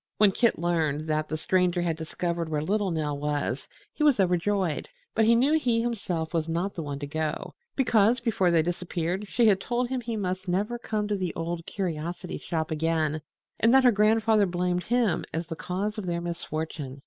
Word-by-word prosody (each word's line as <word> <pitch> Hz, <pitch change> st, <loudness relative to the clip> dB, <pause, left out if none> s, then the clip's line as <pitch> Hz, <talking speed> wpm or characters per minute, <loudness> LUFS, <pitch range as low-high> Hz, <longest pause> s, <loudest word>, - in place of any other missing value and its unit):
When 210 Hz, -2 st, +6 dB
Kit 235 Hz, +4 st, +2 dB
learned 160 Hz, -4 st, 0 dB
that 155 Hz, 0 st, 0 dB
The 155 Hz, -, -2 dB
Stranger 180 Hz, +1 st, +1 dB
had 165 Hz, -2 st, 0 dB
discovered 170 Hz, +1 st, -3 dB
where 150 Hz, -1 st, -1 dB
little 205 Hz, +3 st, +1 dB
Nell 150 Hz, -4 st, -2 dB
was 145 Hz, -3 st, -2 dB, 0.3 s
he -, -, -8 dB
was 290 Hz, -7 st, +4 dB
overjoyed; 180 Hz, -2 st, +1 dB, 0.2 s
but 220 Hz, -, +3 dB
he 230 Hz, +1 st, +6 dB
knew 265 Hz, +6 st, +3 dB
he 240 Hz, -5 st, +1 dB
himself 190 Hz, -9 st, -2 dB
was 165 Hz, -1 st, 0 dB
not 175 Hz, +4 st, -1 dB
the 170 Hz, -, -4 dB
one 145 Hz, -2 st, -4 dB
to 145 Hz, -, -5 dB
go, 155 Hz, +1 st, -3 dB, 0.2 s
because 235 Hz, -2 st, +3 dB
before 225 Hz, -6 st, +1 dB
they 165 Hz, -2 st, +4 dB
disappeared 175 Hz, +2 st, -2 dB
she 235 Hz, +3 st, +2 dB
had 195 Hz, -3 st, +4 dB
told 240 Hz, +2 st, -1 dB
him 260 Hz, -1 st, -2 dB
he 230 Hz, -1 st, -3 dB
must 185 Hz, -1 st, -3 dB
never 205 Hz, +7 st, -1 dB
come 215 Hz, -3 st, -2 dB
to 205 Hz, -, 0 dB
the 185 Hz, -3 st, -3 dB
Old 165 Hz, 0 st, -4 dB
Curiosity 175 Hz, -1 st, -4 dB
Shop 160 Hz, -1 st, -3 dB
again 155 Hz, -1 st, 0 dB, 0.4 s
and 230 Hz, -, +4 dB
that 265 Hz, -, +6 dB
her 250 Hz, -, +7 dB
grandfather 215 Hz, 0 st, +3 dB
blamed 180 Hz, 0 st, -1 dB
him 240 Hz, -4 st, +1 dB
as 165 Hz, +2 st, -2 dB
the 165 Hz, -, -6 dB
cause 200 Hz, +6 st, -3 dB
of 190 Hz, -, -5 dB
their 170 Hz, -1 st, -1 dB
misfortune. 155 Hz, -5 st, -5 dB
180 Hz, 195 wpm, -27 LUFS, 160-215 Hz, 0.4 s, her